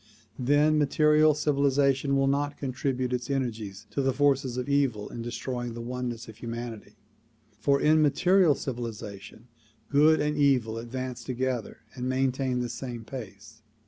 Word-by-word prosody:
Then 145 +4 +3
material 150 +1 +4
civilization 140 -2 +2
will 135 - +3
not 145 +1 0
contribute 130 -1 -2
its 125 +2 -3
energies 110 -7 -3
to 140 - -1
the 135 0 +2
forces 135 -2 +1
of 125 - -3
evil 135 -7 +1
in 120 - -7
destroying 120 0 -4
the - - -6
oneness 120 -1 -4
of 110 - -11
humanity, 115 -2 -7 0.6
for 140 +6 +2
in 155 +1 +4
material 170 +2 +4
civilization 115 -4 -7 0.4
good 150 +2 +5
and 150 0 0
evil 130 -6 +2
advance 125 +1 -5
together 130 -2 -3
and 125 -1 -4
maintain 130 -1 0
the 120 - -3
same 120 -3 -6
pace. 110 -2 -9
130 Hz, 145 wpm, -27 LUFS, 120-140 Hz, 0.6 s, good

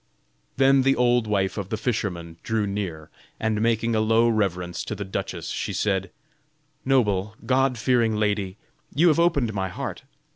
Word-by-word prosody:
Then 135 0 +5
the 135 +1 +3
old 120 -2 +2
wife 100 -1 0
of 95 -2 -5
the 110 - -2
fisherman 90 -8 -3
drew 110 -2 -1
near, 95 -6 -4 0.3
and 110 -1 0
making 115 0 +1
a - - +2
low 115 +2 +3
reverence 90 -6 -1
to 105 - -4
the 100 0 -5
duchess, 95 - -4
she - - -3
said: 95 -2 0 0.7
"Noble, 105 -6 +1
god 130 -1 +2
fearing 115 -1 +2
lady, 105 -2 -1 0.4
you 170 +5 +5
have 160 - +3
opened 140 -10 +2
my 95 -1 -2
heart. - - -5
110 Hz, 160 wpm, -24 LUFS, 100-120 Hz, 0.7 s, Then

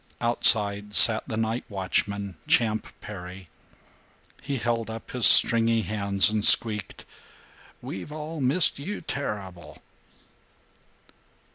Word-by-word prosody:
Outside 105 -3 +1
sat 110 -1 +6
the 110 - -6
night 115 +2 -4
watchman, 100 0 -4
Champ 110 -2 -1
Perry. 90 -3 -12 0.9
He 140 - -6
held 115 0 -4
up 110 0 -10
his 125 -3 +4
stringy 115 -1 +4
hands 100 -2 +1
and 105 -1 -3
squeaked, 105 -4 +3 0.8
"We've 95 +10 -9
all 155 0 -8
missed 140 +4 +1
you 200 +9 -8
terrible." 95 - -8
110 Hz, 105 wpm, -23 LUFS, 100-120 Hz, 0.9 s, sat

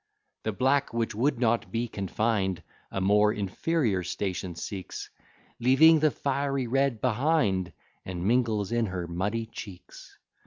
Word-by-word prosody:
The 110 - -2
black, 135 +3 +1
which 115 -1 0
would 125 +4 0
not 120 -1 +1
be 115 +1 -1
confined, 100 -2 -1 0.3
A - - -3
more 105 +2 +4
inferior 105 - 0
station 90 -1 -3
seeks, 95 +2 -6 0.5
Leaving 145 +7 +6
the 155 0 +4
fiery 140 0 -1
red 135 -1 +1
behind, 115 - +1 0.3
And 90 -1 -5
mingles 110 -3 +1
in 120 -1 +1
her 90 -2 -4
muddy 100 +7 -2
cheeks. 105 -5 -11
115 Hz, 130 wpm, -28 LUFS, 95-130 Hz, 0.5 s, Leaving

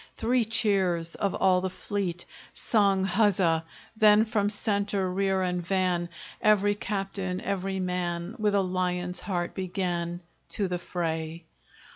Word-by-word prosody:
Three 240 0 +1
cheers 190 -7 +1
of 200 - -1
all 185 -1 +3
the 190 - -1
fleet 185 -2 -3 0.3
Sung 200 -4 +2
huzza! 185 -4 +2 0.3
Then, 215 0 +6
from 210 -2 +1
centre, 205 -2 0
rear, 190 0 +1
and 180 -1 -1
van, 180 -1 0 0.3
Every 205 -1 +4
captain, 195 -2 -3
every 195 0 -2
man, 180 0 -2
With 210 -1 +2
a 200 - +3
lion's 180 -1 -1
heart 175 -3 -3
began 175 -2 -2 0.4
To 200 - +1
the 180 -1 -2
fray. 165 -2 -3
190 Hz, 130 wpm, -27 LUFS, 180-205 Hz, 0.4 s, Then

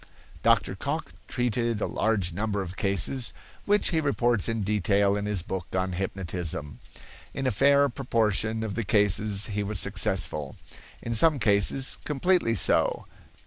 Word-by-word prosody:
Dr. 105 -5 +2
Cocke 145 +8 -4
treated 120 -2 -1
a - - -1
large 100 -6 -1
number 100 +1 -2
of 90 0 -8
cases, 100 +6 -1 0.3
which 205 +1 +3
he 160 -2 0
reports 120 -7 +1
in 115 -2 -2
detail 100 0 +1
in 105 0 -3
his 100 -5 -1
book 95 -1 -5
on 95 0 -1
hypnotism. 90 -7 -4 0.6
In 135 - -3
a 130 - +2
fair 140 +6 +4
proportion 110 -4 0
of 110 -3 -4
the 115 - -2
cases 105 0 +3
he 105 - -1
was 100 -1 0
successful; 75 -3 0 0.5
in 115 - -3
some 150 +7 +3
cases 110 +4 +2
completely 150 -4 +1
so. 95 - +1
105 Hz, 145 wpm, -26 LUFS, 95-120 Hz, 0.6 s, fair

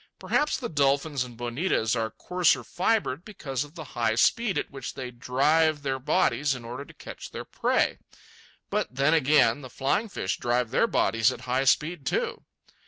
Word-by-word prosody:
Perhaps 300 0 +1
the 245 - -4
dolphins 140 - +1
and 120 -2 -11
bonitas 120 -1 0
are 110 -1 -1
coarser 180 - +1
fibred 180 -7 0
because 140 - -4
of 145 +2 -14
the 160 - -7
high 115 -2 +1
speed 200 - +2
at - - -3
which 135 -3 -7
they 130 -2 -5
drive 145 +5 +2
their 135 -1 -1
bodies 140 +1 +1
in 120 -2 -9
order 125 +4 -6
to - - -15
catch - - -9
their - - -7
prey. - - 0 0.7
But 125 - -1
then 140 +4 +3
again, 150 -1 +4
the 130 - -9
flying 140 - 0
fish 95 - -3
drive 120 -1 0
their - - +3
bodies 115 +4 +2
at - - -8
high 130 +2 0
speed, 150 +1 +1
too. - - -1
135 Hz, 175 wpm, -27 LUFS, 125-155 Hz, 0.7 s, again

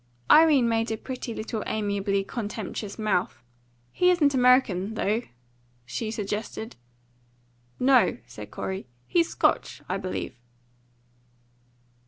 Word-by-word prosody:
Irene 300 -6 +7
made 225 0 +1
a 220 - -2
pretty 255 0 -6
little 220 0 -4
amiably 200 -2 0
contemptuous 210 -1 -5
mouth. 210 - 0 0.5
"He 360 - +3
isn't 310 -6 +4
American, 250 -6 +3
though?" 215 +2 0 0.6
she 220 - -4
suggested. 215 +1 -4 1.0
"No," 260 0 +4
said - - -10
Corey; 190 -4 -5 0.2
"he's 335 -1 +2
Scotch, - - 0
I 185 - -1
believe." 185 -9 -5
220 Hz, 105 wpm, -26 LUFS, 200-255 Hz, 1.0 s, Irene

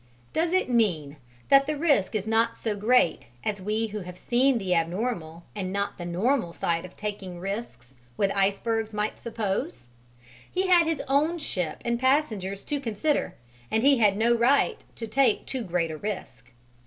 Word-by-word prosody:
Does 330 +1 +1
it 370 +1 +2
mean 175 - +1 0.3
that 275 0 +6
the 305 -1 -1
risk 285 - +2
is 210 -2 -1
not 225 +1 +1
so 220 -2 -2
great 210 - +2 0.2
as 205 -2 -2
we 215 +3 0
who 210 -1 -5
have 180 -2 -9
seen 250 +5 +2
the 190 -4 0
abnormal 170 -1 -2
and 185 -3 -3
not 200 0 -2
the 175 - -5
normal 190 +2 0
side 170 +1 -1
of 185 - -13
taking 195 -4 -5
risks 175 - -6 0.2
with 195 -1 +2
icebergs 215 +3 0
might 210 +1 -2
suppose? 225 - -3 0.6
He 375 +1 0
had 350 -3 +5
his 325 -1 -1
own 300 +5 +2
ship 180 - -3
and 235 0 0
passengers 225 -8 0
to 290 - -2
consider, 270 +4 -1 0.3
and 220 - +1
he 275 -2 +5
had 205 -3 +4
no 230 +2 +3
right 240 +4 +2
to 230 - -5
take 270 +4 +2
too 260 - -4
great 175 -5 -1
a 155 - -5
risk. 185 -10 -6
215 Hz, 175 wpm, -26 LUFS, 185-255 Hz, 0.6 s, that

